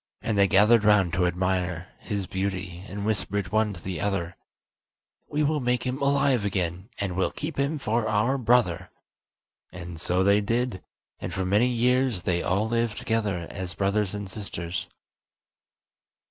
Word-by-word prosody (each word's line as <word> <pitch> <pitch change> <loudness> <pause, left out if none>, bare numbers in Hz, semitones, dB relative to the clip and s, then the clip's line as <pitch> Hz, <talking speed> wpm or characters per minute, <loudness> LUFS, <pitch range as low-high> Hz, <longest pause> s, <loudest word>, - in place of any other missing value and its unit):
And 110 - 0
they 100 -1 +5
gathered 105 +3 +5
round 105 -5 +4
to 90 0 +2
admire 90 0 -1
his 100 -3 -3
beauty, 95 -2 -3
and 100 +1 -5
whispered 100 -2 -1
one 110 0 +2
to 90 - -9
the 90 -4 -4
other: 95 -4 -1 0.9
"We 150 +1 0
will 150 +1 +1
make 125 -1 0
him 130 +2 -2
alive 140 -4 +3
again, 95 0 -2
and 95 -3 -2
will 95 - +1
keep 155 0 -6
him 140 +3 +1
for 115 -4 0
our 110 +6 +1
brother." 120 -8 +2 0.8
And 85 -2 -8
so 90 +1 +1
they 100 +2 +4
did, 115 -1 -1 0.4
and - - -5
for 95 - -2
many 105 +6 +3
years 125 -4 +1
they 85 -1 +1
all 100 +4 +1
lived 115 -1 0
together 105 -6 -1
as 95 -3 -5
brothers 100 0 0
and 100 -1 -5
sisters. 95 -3 -5
100 Hz, 160 wpm, -26 LUFS, 95-115 Hz, 0.9 s, they